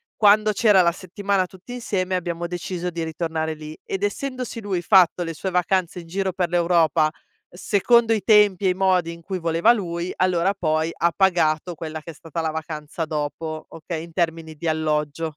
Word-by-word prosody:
quando 215 0 +5
c'era 200 -2 +5
la 170 - +3
settimana 195 +1 -1
tutti 190 +6 -12
insieme, 190 -6 -2
abbiamo 175 -1 -3
deciso 180 0 -4
di 170 0 -4
ritornare 160 0 -2
lì. 155 0 -9
Ed 195 +1 -4
essendosi 255 +2 -3
lui 195 -4 -2
fatto 180 -2 +5
le 165 -1 -4
sue 190 +5 -4
vacanze 180 0 0
in - - -14
giro 190 +2 -1
per 180 -1 -1
l'Europa 170 -3 +3 0.4
secondo 225 +5 +2
i 215 - 0
tempi 205 -3 +4
e - - +4
i - - +2
modi 185 -3 +1
in 170 - -13
cui 185 +2 -4
voleva 170 +6 +3
lui, 175 -5 -3
allora 185 +1 +2
poi 160 -3 0
ha 170 0 +2
pagato 175 -3 +2
quella 155 0 -6
che 165 - -9
è - - -14
stata 165 +2 -6
la 160 - -1
vacanza 155 0 -5
dopo, 155 +1 -4
okay, 165 0 -6
in 170 0 -12
termini 165 -2 -2
di 165 +3 -5
alloggio. 155 -1 -1
175 Hz, 185 wpm, -23 LUFS, 160-190 Hz, 0.4 s, quando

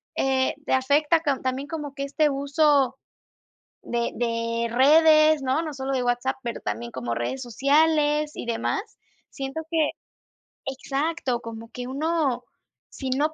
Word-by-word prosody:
eh, 265 -1 +1
te - - 0
afecta 290 +5 +3
con 280 -4 0
también 260 +2 -2
como 300 -4 -5
que 275 - -3
este 295 +2 +1
uso 280 -1 +2 0.9
de 235 0 -1
de 230 0 -1
redes, 310 +4 +6
¿no? 265 +5 +1
No 310 -2 -5
solo 270 0 -3
de 255 -2 0
WhatsApp, 245 +2 0
pero 235 - -4
también 115 +3 -4
como 120 -2 -3
redes 120 - -3
sociales 295 +4 +2
y - - -6
demás. 235 - -1 0.5
Siento 270 +4 -5
que 315 -2 +2 0.7
exacto 270 -1 -2
como 230 0 -8
que 250 0 -6
uno, 295 -1 0 0.5
si 265 -2 -6
no 300 +4 +1
270 Hz, 145 wpm, -25 LUFS, 245-300 Hz, 0.9 s, redes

